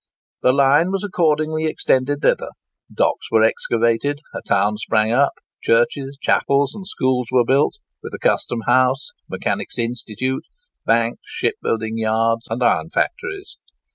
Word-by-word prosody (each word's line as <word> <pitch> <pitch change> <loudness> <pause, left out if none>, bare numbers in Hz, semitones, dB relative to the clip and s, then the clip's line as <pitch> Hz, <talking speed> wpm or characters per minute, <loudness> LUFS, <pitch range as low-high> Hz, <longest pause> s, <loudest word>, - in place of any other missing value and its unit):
The 125 - +4
line 140 +5 +4
was 195 0 -2
accordingly 155 -4 0
extended 145 -2 0
thither; - - +2 0.4
docks - - 0
were 110 -1 +4
excavated; 115 +5 +1
a - - -5
town 105 +2 +1
sprang 110 0 +1
up; 135 +4 +3 0.3
churches, 135 +4 +1
chapels, 140 0 +2
and 195 -3 -9
schools 130 - 0
were 125 -2 +3
built, 135 - +2 0.2
with - - -8
a - - -8
custom 120 - 0
house, 130 +2 +2 0.2
mechanics' - - -3
institute, 120 +2 -3 0.4
banks, 115 +1 +1
shipbuilding 110 0 -2
yards, 115 +1 0
and 115 +3 -2
iron 120 +7 +2
factories. 380 - -3
130 Hz, 135 wpm, -20 LUFS, 115-145 Hz, 0.4 s, The